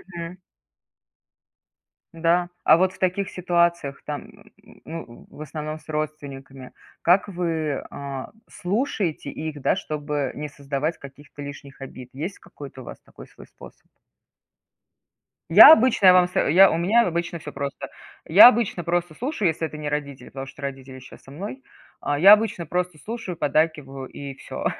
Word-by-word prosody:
Мгм. 170 +2 -7 1.8
Да, 170 +2 +1
а - - +6
вот 185 +1 +1
в - - -18
таких 190 +2 -1
ситуациях, 170 -6 0
там, 150 -1 -8 0.4
ну, 160 -7 -9
в - - -13
основном 155 +1 -6
с 155 - -23
родственниками, 140 -4 -6 0.3
как 180 +4 +3
вы, 165 -6 -3
а, 140 -2 -7 0.2
слушаете 190 - -2
их, 155 -2 -6
да, - - +2
чтобы 145 -3 -3
не 150 +1 -5
создавать 145 +3 -4
каких-то 140 +1 -13
лишних 140 -1 -10
обид? 130 -2 -10
Есть 160 +9 -6
какой-то - - -12
у - - -12
вас - - -10
такой - - -15
свой - - -16
способ? - - -16 1.6
Я - - +11
обычно 230 -7 +3
я 185 - +9
вам 180 -1 +5
сов 180 - 0
у 180 +2 +6
меня 210 +7 +3
обычно 170 0 -3
всё 150 - -9
просто. 140 0 -5 0.4
Я 195 +8 +9
обычно 225 -7 +1
просто 175 -1 -1
слушаю, 240 - -2
если 160 0 -1
это 155 - -10
не 150 -1 -4
родители, 140 -4 -5
потому 135 0 -8
что 140 - -13
родители 135 -1 -7
щас 130 - -15
со - - -18
мной. 205 - -8 0.4
А 145 - -1
я 195 +4 +9
обычно 215 -5 +1
просто 180 0 -3
слушаю, 210 - -7
поддакиваю, 145 -3 -1
и 140 -1 -8
всё. - - -8
155 Hz, 155 wpm, -23 LUFS, 140-180 Hz, 1.8 s, Я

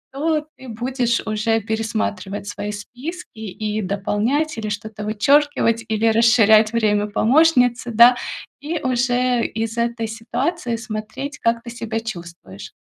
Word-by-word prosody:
то 305 +1 0
ты 260 - -12
будешь 240 +1 -1
уже 220 +1 0
пересматривать 215 -2 -3
свои 205 0 -4
списки 250 - -8
и 215 0 -3
дополнять, 215 - -1
или 215 -1 -3
что-то 210 0 -6
вычеркивать, 230 +1 +2
или 220 +1 0
расширять 220 -1 +5
время 210 -2 +1
помощницы, 250 +1 +3
да, 235 +2 +7 0.4
и 315 +4 -3
уже 250 -1 +1
из 225 +1 -3
этой 235 -1 -1
ситуации 240 +4 -2
смотреть, 230 +6 -6
как 230 0 0
ты 235 - -8
себя 230 -1 -4
чувствуешь. 170 - -9
230 Hz, 125 wpm, -21 LUFS, 215-250 Hz, 0.4 s, да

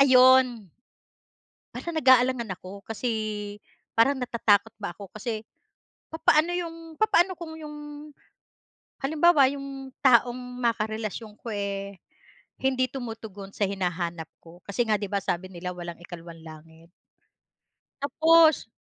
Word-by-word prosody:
ayun. 255 -5 +6 1.1
Parang 340 - -5
nag-aalangan 255 -5 +4
ako, 190 +2 -10
kasi 225 +2 -2 0.9
parang 270 +5 +4
natatakot 225 -3 +2
ba 200 -4 -4
ako. 200 -3 -11
Kasi 215 0 -4 0.6
papaano 320 +1 +3
'yong 330 -2 -6
papaano 385 -3 +3
kung 325 -2 -8
'yong, 300 -1 -8 1.3
halimbawa 300 -1 +5
yung 275 -1 -7
taong 245 -1 +5 0.2
makarelasyon 220 -1 -2
ko 235 - -6
eh, 200 -1 -4 0.6
hindi 260 -1 +2
tumutugon 220 -6 -7
sa 205 - 0
hinahanap 175 -4 -3
ko. 170 +1 -15
Kasi 205 +4 0
nga 215 - +4
'di 205 - -3
ba 200 -1 0
sabi 180 +1 -2
nila, 180 +1 -5
walang 175 -1 -8
ikalawang 170 -2 -10
langit. 160 +1 -14 1.1
Tapos 320 -2 +4
230 Hz, 115 wpm, -26 LUFS, 195-275 Hz, 1.3 s, ayun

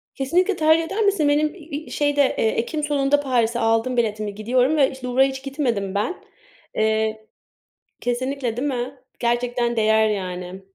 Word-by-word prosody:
Kesinlikle 360 +9 +1
tercih 315 +1 +4
eder 395 +7 -3
misin? 385 -8 +2
Benim, 300 +2 +1
iii, 315 -3 -8
şeyde, 290 0 +1 0.2
eee, - - +2
ekim 235 +8 -2
sonunda 290 -1 +2
Paris'e 240 -4 0
aldım 225 +3 +1
biletimi, 215 -3 -1
gidiyorum 250 +7 +1
ve 275 -3 +4
işte, 260 -1 -7
Louvre'a 260 +2 +4
hiç 265 0 -4
gitmedim 240 -9 -2
ben. 210 - -2 0.5
Eee 220 0 0 0.7
kesinlikle, 245 -1 -2
değil 275 +4 -1
mi? 255 0 -3 0.2
Gerçekten 240 0 0
değer, 220 0 +3
yani. 185 -2 -4
250 Hz, 150 wpm, -22 LUFS, 220-290 Hz, 0.7 s, tercih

